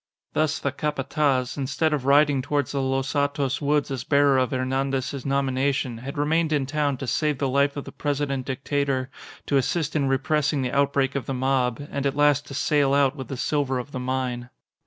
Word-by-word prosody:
Thus 155 Hz, 0 st, +1 dB
the 140 Hz, -, -2 dB
Capataz, 140 Hz, -2 st, -1 dB
instead 150 Hz, +3 st, 0 dB
of 140 Hz, -4 st, -2 dB
riding 145 Hz, -1 st, +4 dB
towards 145 Hz, 0 st, -1 dB
the 140 Hz, -, -1 dB
Los 135 Hz, 0 st, -1 dB
Hatos 140 Hz, -2 st, 0 dB
woods 145 Hz, -1 st, +1 dB
as 130 Hz, -3 st, -3 dB
bearer 140 Hz, -1 st, +4 dB
of 130 Hz, -, +1 dB
Hernandez's 135 Hz, 0 st, -2 dB
nomination, 135 Hz, -2 st, 0 dB
had 135 Hz, +4 st, -7 dB
remained 155 Hz, +2 st, +1 dB
in 145 Hz, -3 st, +1 dB
town 145 Hz, -1 st, 0 dB
to 135 Hz, -, -5 dB
save 150 Hz, +4 st, 0 dB
the 140 Hz, -, 0 dB
life 140 Hz, +2 st, +1 dB
of 140 Hz, -, -5 dB
the -, -, -8 dB
President 140 Hz, -2 st, -2 dB
Dictator, 135 Hz, 0 st, -1 dB, 0.3 s
to 140 Hz, -, +2 dB
assist 155 Hz, +3 st, -1 dB
in 140 Hz, -3 st, +2 dB
repressing 145 Hz, +1 st, +1 dB
the 125 Hz, -, -2 dB
outbreak 140 Hz, -1 st, +2 dB
of 140 Hz, -, -3 dB
the 135 Hz, -, -2 dB
mob, 130 Hz, -2 st, +1 dB
and 140 Hz, 0 st, -1 dB
at 140 Hz, -, -2 dB
last 145 Hz, -1 st, +3 dB
to 140 Hz, -, -7 dB
sail 145 Hz, -1 st, +2 dB
out 140 Hz, -1 st, +3 dB
with 130 Hz, -4 st, -7 dB
the 135 Hz, -, -5 dB
silver 140 Hz, -1 st, 0 dB
of 125 Hz, +3 st, -6 dB
the 130 Hz, -, -4 dB
mine. 125 Hz, -1 st, -3 dB
140 Hz, 200 wpm, -24 LUFS, 130-145 Hz, 0.3 s, riding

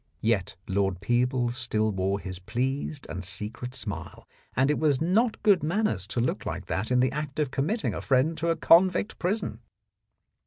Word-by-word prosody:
Yet 110 Hz, -5 st, 0 dB
Lord 95 Hz, -1 st, 0 dB
Peebles 120 Hz, +3 st, +1 dB
still 110 Hz, -4 st, +1 dB
wore 95 Hz, +1 st, -1 dB
his 95 Hz, -3 st, -6 dB
pleased 130 Hz, -, -2 dB
and 95 Hz, -, -5 dB
secret 110 Hz, +6 st, -3 dB
smile, 105 Hz, -5 st, -6 dB, 0.3 s
and 135 Hz, +3 st, +3 dB
it 150 Hz, -, 0 dB
was 145 Hz, -4 st, +2 dB
not 215 Hz, +8 st, +1 dB
good 200 Hz, -5 st, +5 dB
manners 155 Hz, -, 0 dB
to 110 Hz, -, -2 dB
look 120 Hz, -, -1 dB
like -, -, -4 dB
that 105 Hz, +4 st, -2 dB
in 125 Hz, 0 st, +3 dB
the 130 Hz, 0 st, +2 dB
act 150 Hz, -1 st, -4 dB
of 150 Hz, -4 st, 0 dB
committing 195 Hz, -, -1 dB
a -, -, -4 dB
friend 135 Hz, +5 st, +2 dB
to 170 Hz, -, 0 dB
a 165 Hz, -, +2 dB
convict 180 Hz, +5 st, +4 dB
prison. 195 Hz, +5 st, -1 dB
130 Hz, 180 wpm, -27 LUFS, 105-155 Hz, 0.3 s, good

